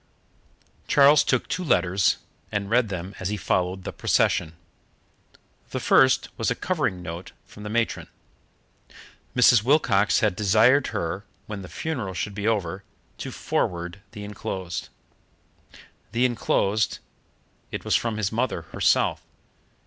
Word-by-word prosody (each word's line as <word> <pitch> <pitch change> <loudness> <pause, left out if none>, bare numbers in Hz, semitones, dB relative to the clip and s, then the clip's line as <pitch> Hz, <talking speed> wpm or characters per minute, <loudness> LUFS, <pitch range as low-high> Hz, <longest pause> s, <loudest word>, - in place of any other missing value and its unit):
Charles 145 +1 +6
took 130 - 0
two 185 - -2
letters, 90 - +2 0.3
and 100 0 -3
read 120 -2 +3
them 95 0 -5
as 95 - -2
he 105 - -2
followed 90 +1 -1
the - - -5
procession. 80 - +1 1.2
The - - -3
first 130 0 +4
was 115 - +1
a 125 - 0
covering 120 - -1
note 85 +2 -7
from 105 - -14
the 105 - -6
matron. 115 +1 -1 1.3
Mrs. 125 -2 +6
Wilcox 120 -7 +3
had 105 -4 +2
desired 110 +8 +4
her, 85 +5 -3 0.2
when 105 -2 -6
the 90 - -9
funeral 120 - -4
should 100 +3 -3
be 100 +2 -3
over, 100 -4 -1 0.4
to - - -5
forward 85 +2 -2
the 105 - -7
enclosed. 95 -3 -5 1.2
The 120 +2 +3
enclosed 110 -3 +1 0.7
it - - -5
was - - +2
from 115 -2 0
his 100 -2 -1
mother 120 +3 -1
herself. - - +2
105 Hz, 135 wpm, -25 LUFS, 95-120 Hz, 1.3 s, Charles